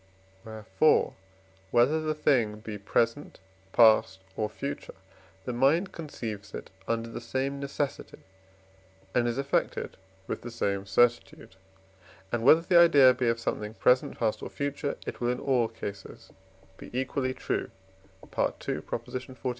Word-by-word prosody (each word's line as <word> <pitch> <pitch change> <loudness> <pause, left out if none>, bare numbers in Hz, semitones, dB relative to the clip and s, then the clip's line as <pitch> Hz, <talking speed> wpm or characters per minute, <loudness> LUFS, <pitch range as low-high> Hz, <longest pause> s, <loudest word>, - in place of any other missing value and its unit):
Wherefore, 110 +7 +1 0.6
whether 130 +9 +3
the 155 0 -1
thing 120 -8 +1
be 105 -2 -7
present, 115 +7 -1 0.3
past, 110 -4 +5
or 105 -1 -1
future, 140 +1 -6 0.5
the 125 - -3
mind 150 +10 +2
conceives 110 - -7
it - - -8 0.2
under 115 0 -1
the 115 - -7
same 135 +4 -2
necessity 140 0 -4 1.0
and 120 -1 +2
is 120 +1 -1
affected 140 0 -1 0.3
with - - -4
the 120 - -7
same 100 -4 -2
certitude; 120 +2 +1 0.8
and 120 - -1
whether 150 +7 +6
the 175 0 +4
idea 145 -7 +7
be 125 -1 -1
of 115 0 +1
something 105 -1 -3
present, 125 +2 +2
past, 110 -2 -1
or - - -6
future, 145 +1 -3
it - - -6
will 120 - +1
in 125 0 -1
all 125 -4 +2
cases 105 -3 -9 0.4
be - - -11
equally 130 0 -2
true - - -2 0.5
(II. - - -14
xli.) 130 0 -4
120 Hz, 140 wpm, -28 LUFS, 115-140 Hz, 1.0 s, idea